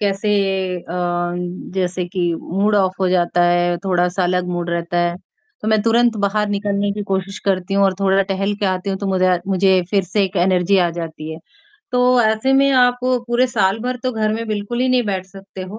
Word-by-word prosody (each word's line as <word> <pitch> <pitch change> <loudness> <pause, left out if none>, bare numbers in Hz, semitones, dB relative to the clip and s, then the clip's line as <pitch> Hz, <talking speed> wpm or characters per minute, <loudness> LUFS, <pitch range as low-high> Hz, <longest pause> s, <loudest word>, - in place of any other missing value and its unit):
कैसे 205 +1 0 0.5
अ, 170 - -10 0.8
जैसे 180 -1 -1
कि 175 -2 -1
मूड 200 +4 0
ऑफ़ 190 -1 +2
हो 190 - +2
जाता 175 -1 +2
है, 175 0 +2
थोड़ा-सा 180 0 +1
अलग 180 0 0
मूड 175 -1 -3
रहता 170 +1 -2
है। 175 0 0 0.5
तो 215 - -2
मैं 215 -1 +3
तुरंत 230 +1 +3
बाहर 210 +1 0
निकलने 200 0 -1
की 210 - -4
कोशिश 195 0 -3
करती 195 0 0
हूँ 200 - +4
और 190 -1 +2
थोड़ा 195 0 +3
टहल 195 +1 -2
के 205 - +1
आती 185 +1 -1
हूँ, 190 - -2
तो 200 - -4
मुझा 185 -1 +2
मुझे 190 -1 +3
फिर 200 -2 +2
से 195 +3 0
एक 190 +1 -5
एनर्जी 185 +1 +2
आ 175 - +3
जाती 160 -1 -6
है। 160 - -8 0.5
तो 250 0 +4
ऐसे 220 +4 +1
में 275 +1 +4
आप 245 -1 +4
पूरे 250 0 +1
साल 205 -4 +1
भर 250 +2 -2
तो 255 - 0
घर 215 -1 0
में 230 +1 -3
बिल्कुल 215 +3 -3
ही 255 - +2
नहीं 255 -1 +3
बैठ 190 -2 -2
सकते 195 -1 -10
हो। 190 +4 -8
195 Hz, 210 wpm, -19 LUFS, 180-215 Hz, 0.8 s, हूँ